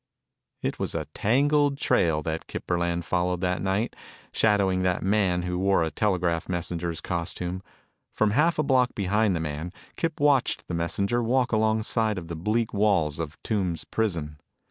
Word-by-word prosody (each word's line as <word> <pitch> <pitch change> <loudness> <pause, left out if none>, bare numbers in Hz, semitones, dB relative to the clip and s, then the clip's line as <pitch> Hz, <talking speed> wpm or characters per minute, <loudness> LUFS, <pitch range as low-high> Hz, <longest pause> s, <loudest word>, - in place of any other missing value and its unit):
It - - -2
was - - -2
a 80 -2 -2
tangled 145 +5 +2
trail 80 - +2
that 80 +1 -3
Kip - - -6
Burland 85 -1 0
followed 90 +1 0
that 90 -1 0
night, 100 +5 -1 0.4
shadowing 100 -4 +2
that 90 -1 0
man 95 -3 +2
who 90 0 -2
wore 95 -2 +3
a 80 - -2
telegraph 90 -5 0
messenger's 85 -1 -3
costume. 90 +1 -3 0.5
From 110 -1 +1
half 155 +9 +3
a 155 - +2
block 130 -3 +2
behind 100 0 +1
the - - -1
man, 80 +2 -4 0.3
Kip 165 -2 -2
watched 145 -3 +2
the - - -5
messenger 100 +8 0
walk 125 +1 +1
along 110 0 +2
side 110 -2 0
of 85 -2 -6
the 85 - -4
bleak 110 +7 -1
walls 95 -8 +2
of 80 -1 -5
Tombs 95 -6 -1
prison. 80 -9 -2
95 Hz, 165 wpm, -26 LUFS, 85-110 Hz, 0.5 s, wore